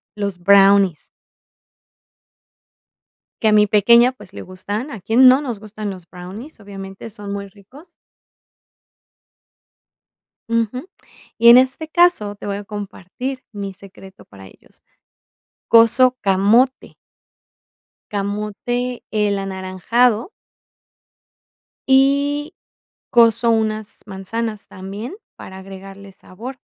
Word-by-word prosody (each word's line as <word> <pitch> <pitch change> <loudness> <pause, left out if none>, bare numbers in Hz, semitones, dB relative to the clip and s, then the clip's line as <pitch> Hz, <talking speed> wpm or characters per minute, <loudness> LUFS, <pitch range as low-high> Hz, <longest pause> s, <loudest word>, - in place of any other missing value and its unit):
los 200 -3 -3
brownies. 195 -2 +4 2.3
Que 220 - +2
a - - +4
mi 210 0 +5
pequeña, 235 +4 +5
pues, 210 -8 -16
le - - -8
gustan, 205 +8 -5
¿a 220 - -8
quién 240 +7 +5
no 260 +2 +6
nos 245 -8 -5
gustan 215 0 -7
los 185 -3 -9
brownies? 195 - -11
Obviamente, 195 +1 -10
son 205 -2 -8
muy 200 0 -6
ricos. 220 - -18 2.6
Ujú, 230 - -2 0.5
y 235 +1 +6
en 240 - +10
este 260 +5 +1
caso, 315 -12 +2
te - - -11
voy 200 0 -3
a 205 - -7
compartir 205 +5 -7
mi 200 -2 -6
secreto 190 0 -15
para 95 -1 -14
ellos, - - -16 0.8
coso 240 +3 +5
camote. 210 +7 +2 1.2
Camote, 210 +5 -3
el 210 -2 0
anaranjado. 195 - 0 1.6
Y 280 +3 +2 0.6
coso 235 -1 +4
unas 215 -1 -2
manzanas 210 +2 -5
también 200 - -8 0.2
para 190 - -11
agregarle 195 +1 -12
sabor, 235 +8 -11
210 Hz, 105 wpm, -19 LUFS, 195-245 Hz, 2.6 s, en